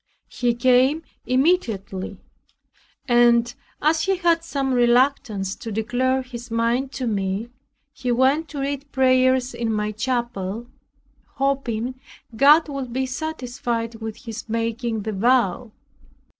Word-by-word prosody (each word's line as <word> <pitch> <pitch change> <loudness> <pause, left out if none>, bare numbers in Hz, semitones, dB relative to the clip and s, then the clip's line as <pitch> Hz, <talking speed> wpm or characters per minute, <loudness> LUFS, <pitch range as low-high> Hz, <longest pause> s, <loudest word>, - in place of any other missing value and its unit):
He 240 -1 0
came 255 +5 +3 0.2
immediately, 225 - 0 0.9
and 240 -1 +4 0.3
as 315 +1 +3
he 385 0 +2
had 340 -2 +2
some 275 -5 -1
reluctance 240 -5 +2
to 225 - -7
declare 245 +5 0
his 245 -1 -9
mind 235 +4 0
to 260 - -3
me, 200 0 -2 0.4
he 250 -1 -2
went 265 +6 +2
to 295 -2 -7
read 280 0 -4
prayers 255 -1 +3
in 235 -1 -2
my 210 0 -1
chapel, 235 -2 -3 0.7
hoping 260 -3 -1 0.4
God 295 +6 +6
would 275 -4 -5
be 260 +2 -1
satisfied 245 -4 -3
with 220 +2 -7
his 230 0 -7
making 230 0 -2
the 220 - -3
vow. 235 0 +2
245 Hz, 120 wpm, -23 LUFS, 230-265 Hz, 0.9 s, God